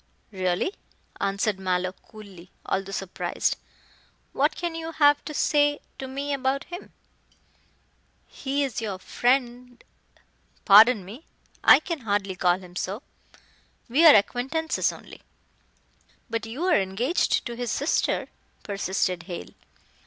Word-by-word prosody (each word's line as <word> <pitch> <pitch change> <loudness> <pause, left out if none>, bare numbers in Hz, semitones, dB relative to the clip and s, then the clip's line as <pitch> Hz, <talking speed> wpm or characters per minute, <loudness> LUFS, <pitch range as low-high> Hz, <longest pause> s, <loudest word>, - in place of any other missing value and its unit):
"Really," 185 - -1 0.5
answered 200 0 -1
Mallow 185 -1 -1
coolly, 195 -3 -14 0.2
although 195 0 -2
surprised, 195 -1 -2 0.8
"what 290 +3 +1
can 345 -1 -3
you 325 0 -6
have 290 -2 +4
to 305 - -6
say 290 0 +2 0.2
to 265 - -5
me 280 +2 -3
about 270 0 -1
him." 355 +1 -9 1.3
"He 280 +1 -2
is 250 -4 -3
your 205 -4 -3
friend 245 +3 -1 0.4
" - - -38
"Pardon 210 0 +7
me. 230 - -11 0.4
I - - +8
can 330 0 -4
hardly 205 -5 -1
call 180 -1 +2
him 180 -1 -14
so. 200 +7 -4 0.9
We 280 +8 +3
are 300 - +10
acquaintances 265 +10 +1
only." - - -13 1.1
"But 225 -1 -2
you 250 +9 -5
are 360 - +3
engaged 220 - 0
to 235 - -5
his 240 0 -4
sister," 285 +7 0 0.4
persisted 190 -3 -1
Hale. 175 - -6
235 Hz, 125 wpm, -25 LUFS, 195-285 Hz, 1.3 s, are